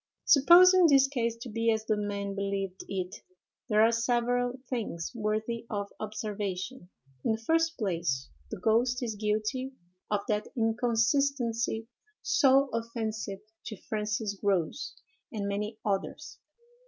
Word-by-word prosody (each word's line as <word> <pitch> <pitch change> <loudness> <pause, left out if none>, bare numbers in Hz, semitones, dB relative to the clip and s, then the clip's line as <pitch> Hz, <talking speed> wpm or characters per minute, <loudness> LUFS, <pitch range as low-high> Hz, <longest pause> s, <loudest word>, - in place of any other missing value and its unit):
Supposing 350 +5 +7
this 275 -3 +6
case 235 -4 -1
to - - -7
be 230 +1 +1
as 220 0 -1
the 215 - +1
men 200 -1 -3
believed 195 -1 -3
it, 185 -1 -3 0.5
there 215 0 +5
are 225 - +5
several 245 +1 +1
things 210 -10 -3
worthy 220 +1 -2
of 200 -1 -4
observation. 210 -1 -4 0.3
In 225 - +2
the - - -2
first 330 +2 +2
place, 170 - -1 0.2
the - - -6
ghost 245 +3 +2
is 230 -2 -2
guilty 215 +5 -2 0.4
of 205 -1 +1
that 210 0 0
inconsistency 230 0 +1 0.4
so 275 0 +4
offensive 220 -3 -3 0.3
to 215 - -6
Francis 210 +1 -2
Grose 195 - -1 0.4
and 205 -3 -3
many 210 +2 -3
others. 205 +9 -3
220 Hz, 130 wpm, -29 LUFS, 205-245 Hz, 0.5 s, Supposing